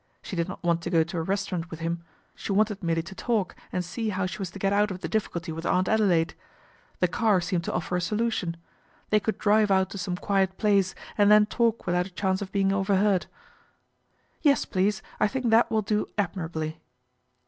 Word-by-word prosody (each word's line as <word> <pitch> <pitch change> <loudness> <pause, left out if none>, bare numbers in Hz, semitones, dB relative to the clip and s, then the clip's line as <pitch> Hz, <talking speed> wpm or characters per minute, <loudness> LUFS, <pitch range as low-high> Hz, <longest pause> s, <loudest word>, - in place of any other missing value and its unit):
She 190 - -6
did 170 +1 -1
no - - -6
want 170 -1 +2
to 170 - -4
go 165 -2 +4
to 170 +2 -6
a - - 0
restaurant 185 -1 -2
with 160 - -8
him, 170 +1 -3 0.3
she - - -6
wante 210 0 +1
merely 165 -2 0
to 170 - -9
talk 215 -2 -1 0.2
and 180 -1 -2
see 220 +5 -3
how 190 -2 -1
she 190 +3 -5
was 190 -3 -3
to 185 - -10
get 195 +1 +1
ou 205 0 +2
of 185 -1 -6
the - - -3
difficulty 175 -6 -2
with 165 +1 -6
Aunt 185 +2 +1
Adelaide. 185 -7 +2 0.7
The 190 +3 +3
c - - -4
seemed 180 -3 0
to - - -2
offer 180 - -2
a 180 - 0
solution. 210 -4 -1 0.5
They 215 - +5
could 220 +1 -2
driv 210 0 +3
out 190 -1 +2
to 200 - -6
some 180 -1 -2
quiet 190 -1 0
place 200 -3 +2 0.2
and 205 0 +6
then 210 0 +7
talk 230 +1 0
without 180 +1 +1
a - - -12
chance 190 +1 -1
of 195 - -5
being 195 -1 +2
overheard. 195 -1 +2 0.6
' - - -43
Yes, 285 -3 +3
please, 195 +1 0 0.2
I - - +4
think 250 0 -1
that 225 +2 +5
will 220 -1 +1
do 210 +1 0
admirably." 160 -5 -3
190 Hz, 215 wpm, -27 LUFS, 175-210 Hz, 0.7 s, then